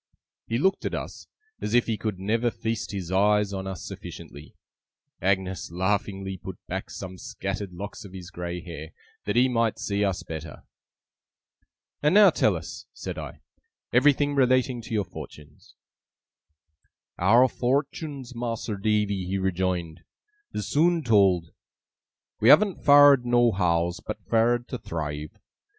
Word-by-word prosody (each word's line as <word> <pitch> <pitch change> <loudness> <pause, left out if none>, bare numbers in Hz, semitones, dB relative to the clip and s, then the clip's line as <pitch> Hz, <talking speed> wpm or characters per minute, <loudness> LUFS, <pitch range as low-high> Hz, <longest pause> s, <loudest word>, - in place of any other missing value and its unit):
He 115 - 0
looked 190 +9 +1
at - - -1
us, - - -7 0.3
as 105 - -1
if 120 - +4
he 115 - -1
could 105 -2 -3
never 110 +5 0
feast 115 -1 -4
his 95 -4 -5
eyes 105 +1 +3
on 95 0 -4
us 95 -2 -6
sufficiently. 75 +2 -10 0.7
Agnes 95 -2 0
laughingly 95 +1 -2
put - - -8
back - - -4
some 95 -1 -8
scattered 100 0 -5
locks 100 +4 -7
of 100 - -11
his 90 -2 -9
grey 90 0 -5
hair, 85 -2 -9 0.3
that - - -1
he 125 +2 +5
might 115 -3 +1
see 100 0 -1
us 95 -3 -1
better. 80 -1 -8 1.4
'And 150 +5 +3
now 210 -1 +8
tell - - +2
us,' - - -8
said - - -6
I, - - -8 0.5
'everything 145 +3 +4
relating 130 -2 +2
to 115 - -8
your 105 -2 0
fortunes.' 75 -1 -12 1.4
'Our 115 +8 +6
fortuns, 135 +1 -2
Mas'r 115 -3 -3
Davy,' 105 -3 0
he 95 +1 -1
rejoined, 90 -3 -2 0.5
'is 105 - -4
soon 165 +6 +2
told. 95 - +3 0.9
We 110 - +4
haven't 200 +1 +5
fared 145 -2 +7
nohows, 95 -9 +2
but - - -7
fared 120 +2 +2
to 125 - -4
thrive. 75 -2 -5
105 Hz, 140 wpm, -26 LUFS, 95-120 Hz, 1.4 s, now